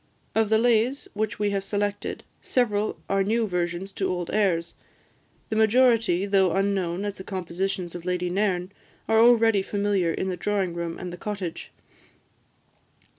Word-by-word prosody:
Of 220 -1 +2
the 220 - +4
lays 240 +3 +2
which 215 0 -2
we 205 -1 0
have 195 -1 -1
selected, 205 0 -2 0.2
several 215 -4 0
are 195 0 +2
new 225 +3 +1
versions 180 0 -2
to 190 -1 -2
old 180 -2 -3
airs; 180 -6 +1 0.8
the 220 - -2
majority, 220 -4 +3
though 195 -3 +3
unknown 195 -1 0
as 205 - -2
the 190 - -10
compositions 185 -1 -3
of 175 - -7
Lady 180 0 -1
Nairn, 185 -1 0 0.4
are 225 0 +4
already 225 -3 +5
familiar 200 -3 0
in 190 - -2
the 185 - -2
drawing 195 -4 -1
room 170 -1 -4
and 180 -1 -6
the - - -7
cottage. 195 -4 -5
195 Hz, 155 wpm, -25 LUFS, 180-215 Hz, 0.8 s, already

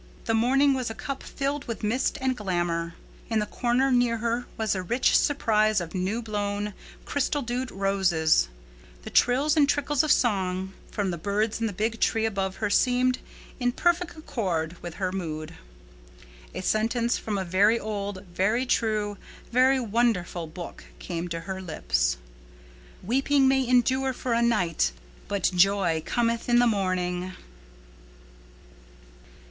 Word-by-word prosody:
The 225 - +1
morning 270 +5 +4
was 255 -3 -2
a 225 - -6
cup 275 +3 -5
filled 280 +1 -3
with 230 -2 -5
mist 245 +7 0
and 260 -1 0
glamor. 175 -5 -2 0.3
In 225 - +1
the 210 - +1
corner 245 +5 +1
near 245 -2 +3
her 235 +2 -2
was 220 -2 0
a 190 - -2
rich 240 +8 +2
surprise 215 -7 +3
of 170 -2 -6
new 195 +5 -1
blown, 205 -1 -2 0.3
crystal 285 0 -1
dewed 245 +2 -3
roses. 190 - +2 0.6
The - - -8
trills 275 +5 +3
and 290 -3 +4
trickles 290 -1 +2
of 310 - +1
song 190 -4 +1 0.2
from 200 -3 -2
the 170 - -5
birds 210 +5 -1
in 225 - +1
the - - -3
big 220 +4 -2
tree 225 0 +2
above 195 -3 -1
her 210 - -2
seemed 250 +2 +3 0.4
in 245 -1 +1
perfect 345 +2 0
accord 180 - -2
with 170 -2 -7
her 185 -2 -2
mood. 155 -5 -5 1.0
A - - -3
sentence 230 +4 +1
from 210 -2 -3
a 190 - -2
very 200 +6 +3
old, 200 -2 -4
very 215 +8 +1
true, 215 -4 0 0.3
very 260 +2 +4
wonderful 215 -7 0
Book 170 +2 -9
came 170 -1 -4
to 165 -1 -4
her 190 +2 -5
lips, - - 0 0.9
"Weeping 270 +6 +3
may 265 -1 +2
endure 260 +2 +2
for 245 -1 -2
a 230 - +2
night 175 - +1 0.3
but 200 -1 0
joy 180 -3 +3
cometh 230 +2 0
in 240 - +5
the 245 - +5
morning." 185 -4 -1
215 Hz, 150 wpm, -26 LUFS, 185-245 Hz, 1.0 s, in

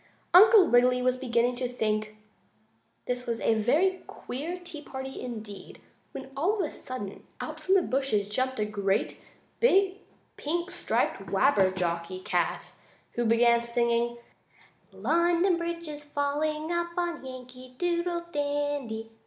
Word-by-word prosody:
Uncle 410 +2 +9
Wiggily 250 -2 +4
was 255 0 +2
beginning 245 -1 +1
to 250 +1 -1
think 215 -3 -2 0.9
this 250 0 -3
was 230 -1 -1
a - - +2
very 310 - +2
queer 325 +8 -6
tea 340 -4 -7
party 265 -2 -7
indeed, 215 -5 -8 0.3
when, 270 0 -8
all 380 +8 +1
of 310 - -3
sudden, 205 -7 -7 0.2
out - - -6
from 380 - +2
the 380 - +4
bushes 255 -7 0
jumped 255 +4 -1
a 210 - +1
great, 200 -1 -1 0.4
big, 390 -4 +3 0.4
pink 345 +4 -2
striped - - -1
Wabberjocky 185 -5 +1
cat, - - -1 0.4
who 240 - -1
began 235 +1 +4
singing: 235 0 +1 0.7
"London 340 - +2
Bridge 335 0 -4
is 295 -1 -7
falling 300 +2 -1
up, 345 0 0
On 345 -3 -2
Yankee 255 -1 -10
Doodle 345 -1 -1
Dandy! 285 -6 -2
260 Hz, 130 wpm, -28 LUFS, 235-335 Hz, 0.9 s, Uncle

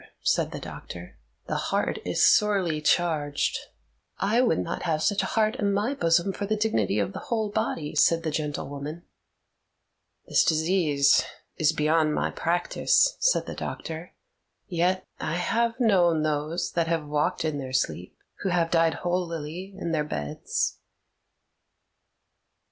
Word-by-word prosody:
said - - +2
the - - -6
doctor. - - -9 0.3
"The - - -2
heart - - 0
is - - +2
sorely 190 -7 +3
charged." 150 -3 +1 0.6
"I 230 +5 +2
would 250 - +2
not 90 - -3
have 155 -3 0
such 205 0 +2
a - - -2
heart 220 +2 +1
in 200 -1 +1
my 210 +7 0
bosom 170 -3 +2
for 200 - -4
the 215 - +1
dignity 160 - 0
of 100 -2 -1
the - - -5
whole 220 -3 0
body," 205 -8 -2
said 165 0 +3
the 160 - -1
gentlewoman. 150 +1 -4 1.2
"This - - +3
disease 155 -4 +3 0.3
is 155 - +3
beyond 155 0 +2
my - - 0
practice," 175 - +2
said - - +2
the - - -6
doctor: 165 +2 -6 0.5
"yet 180 +2 0
I 155 - -2
have 230 +6 0
known 175 -9 +3
those 155 +2 -1
that 170 -1 0
have 165 -2 -1
walked 150 +2 0
in 150 -2 -1
their 130 -1 -6
sleep 90 -8 -2 0.2
who 195 - -1
have 170 -2 +1
died 165 -2 +3
holily 175 +1 -3
in 170 - -3
their 155 -2 +1
beds." 75 - -3
165 Hz, 145 wpm, -26 LUFS, 150-195 Hz, 1.2 s, sorely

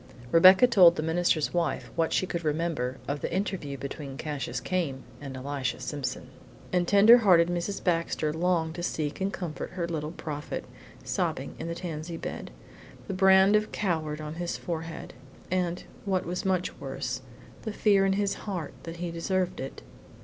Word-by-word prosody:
Rebecca 185 +7 +8
told 185 -8 +7
the 155 - -2
minister's 160 -1 +1
wife 170 -2 -1
what 165 -1 +1
she - - +2
could 170 -2 -4
remember 150 -5 -1
of 145 0 -2
the - - -3
interview 180 -6 -2
between 140 0 -6
Cassius 145 -2 -3
Came 160 -8 -2 0.2
and 135 -2 -6
Elisha 135 0 -3
Simpson, 135 -4 -4 0.4
and 175 -1 +2
tender 215 +5 +8
hearted 175 -6 +5
Mrs. 175 +3 -2
Baxter 165 -3 0
longed 165 -1 +1
to 175 - -6
seek 155 -1 -2
and 195 +1 0
comfort 175 -4 -5
her 175 -2 -2
Little 155 -3 -3
Prophet 150 -3 -5 0.4
sobbing - - -2
in - - -4
the 170 - -3
tansy 165 -1 -5
bed, - - -6 0.6
the - - -3
brand 190 +1 +6
of 210 0 +1
coward 160 -6 -1
on 155 0 -5
his 175 - -2
forehead, 165 -1 -5 0.4
and 180 -1 0 0.2
what 190 -3 0
was 180 +2 -3
much 185 -1 0
worse, - - -4 0.4
the 220 - -4
fear 205 -2 +3
in 195 0 +3
his 200 0 +1 0.2
heart 175 -8 -4
that 165 +2 -7
he 175 0 -3
deserved 180 +2 -1
it. 135 +1 -6
170 Hz, 170 wpm, -28 LUFS, 155-185 Hz, 0.6 s, Rebecca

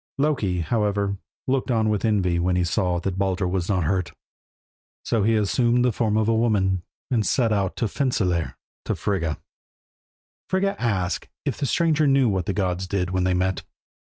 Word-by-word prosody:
Loki, 125 - +1
however, 100 0 0 0.3
looked 130 0 0
on 110 -3 +2
with 105 -2 0
envy 95 -6 +1
when 90 +1 +1
he 90 - +2
saw 90 0 0
that 95 +1 -3
Baldur 95 -1 0
was 90 0 -2
not 95 -4 +1
hurt. 90 +2 0 0.9
So 115 - +1
he 110 +3 +3
assumed 120 +3 +2
the 125 - +3
form 110 -1 0
of 110 -1 +2
a 115 - +3
woman, 100 -5 +2 0.3
and 115 -4 +2
set 115 0 +2
out 100 -3 0
to 115 - 0
Fensalir 95 - 0 0.3
to - - -1
Frigga. 85 -6 -1 1.1
Frigga 195 +1 +1
asked 95 -7 -1 0.2
if - - -2
the 140 - 0
stranger 155 0 +2
knew 135 -2 +4
what 95 -5 -1
the - - +1
gods 95 -1 -1
did 90 -1 -1
when 95 0 0
they 90 0 +2
met. 95 +1 0
100 Hz, 180 wpm, -24 LUFS, 90-115 Hz, 1.1 s, knew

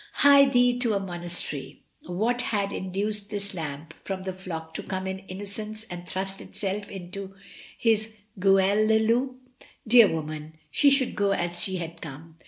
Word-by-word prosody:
Hie 280 0 +9
thee 245 -1 +3
to 235 -4 +1
a - - +2
monastery! 175 -6 -3 0.2
What 220 +8 0
had 200 -4 -1
induced 200 +2 -1
this 200 -1 -1
lamb 150 -3 -5
from 190 -1 -4
the 190 0 -3
flock 165 -4 -7
to - - -4
come 190 -1 -4
in 190 0 -3
innocence 210 +3 -4
and 175 0 -7
thrust 190 +1 -3
itself 205 0 -4
into 195 +1 -7 0.4
his 220 -1 +1 0.2
gueule 195 +2 +4
de 220 0 +5
loup? 240 +4 +1 0.5
Dear 230 -1 +8
woman, 155 -1 -5 0.2
she 285 - +5
should 275 -2 +3
go 200 -1 +2
as 175 -1 0
she 190 - -1
had 165 -1 -6
come. 160 +2 -10
195 Hz, 165 wpm, -26 LUFS, 175-215 Hz, 0.5 s, Hie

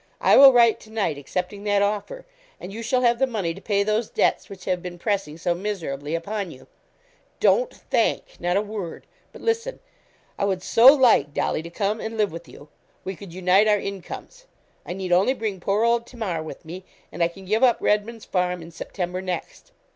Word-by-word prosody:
I - - +5
will 275 0 +10
write 235 -3 +5
to 215 - -16
night 200 -10 -1
accepting 180 +7 -4
that 205 -1 +2
offer, 210 - -3 0.3
and 190 - -8
you 225 - -6
shall 250 +2 0
have 235 -1 +3
the 265 - +3
money 200 -9 -2
to 195 - -12
pay 200 -2 +1
those 215 +2 0
debts - - 0
which 190 -2 -11
have 180 -1 -1
been 175 0 -7
pressing 190 -6 -2
so 175 +1 0
miserably 165 -6 -4
upon 200 +3 -3
you. 130 -4 -13 0.7
Don't - - +3
thank - - -1
not 175 +2 0
a 205 - +1
word 205 -5 -6 0.3
but - - -13
listen. 460 +2 -1 0.6
I 200 - +1
would 190 -2 -1
so 230 +2 +5
like, 235 - +3
Dolly, - - 0
to 165 - -9
come 205 +5 -2
and 225 0 -5
live 210 -2 +1
with 170 +1 -9
you. 145 - -14 0.3
We 190 - -5
could 195 -1 -11
unite 185 +4 +3
our 210 -1 +4
incomes. 200 - -7 0.4
I - - -3
need 185 -1 -5
only 195 +9 +3
bring 215 -5 -3
poor 200 +5 0
old 235 0 +2
Tamar 205 -10 -4
with 160 +2 -9
me, 180 +4 -8 0.3
and - - -6
I 170 - +5
can 190 +3 -13
give 215 +5 +1
up 245 -2 +5
Redman's 215 +2 0
Farm 180 -2 -1
in 165 - -11
September 180 +2 -5
next. 180 -3 -6
200 Hz, 205 wpm, -24 LUFS, 175-225 Hz, 0.7 s, will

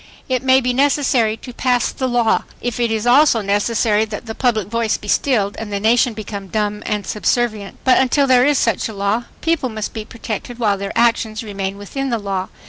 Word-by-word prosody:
It 255 -1 0
may 265 0 +4
be 250 0 0
necessary 260 -5 +2
to 250 - -10
pass 245 -2 +1
the 260 - -3
law, 240 -2 +1
if 245 0 -4
it 235 -1 +1
is 220 0 -1
also 250 -1 +5
necessary 210 +2 +1
that 220 +1 -7
the 220 - -5
public 220 -6 0
voice 230 0 0
be 210 - -11
stilled 205 -4 +1
and 220 -2 -6
the 200 - -1
nation 235 +2 +2
become 200 -2 -6
dumb 210 +1 -2
and 210 -2 -2
subservient. 215 -1 -1
But 260 - +4
until 265 +2 +3
there 255 -2 +5
is 290 +1 +3
such 230 -2 0
a - - -7
law... 200 +4 -1 0.2
people 325 -6 0
must 215 -2 -5
be 220 - -5
protected 230 +1 -6
while 210 -5 +1
their 200 +2 -4
actions 230 -1 +1
remain 200 -2 -4
within 270 +7 -4
the 235 - 0
law. 195 -3 -3
225 Hz, 210 wpm, -19 LUFS, 210-245 Hz, 0.2 s, also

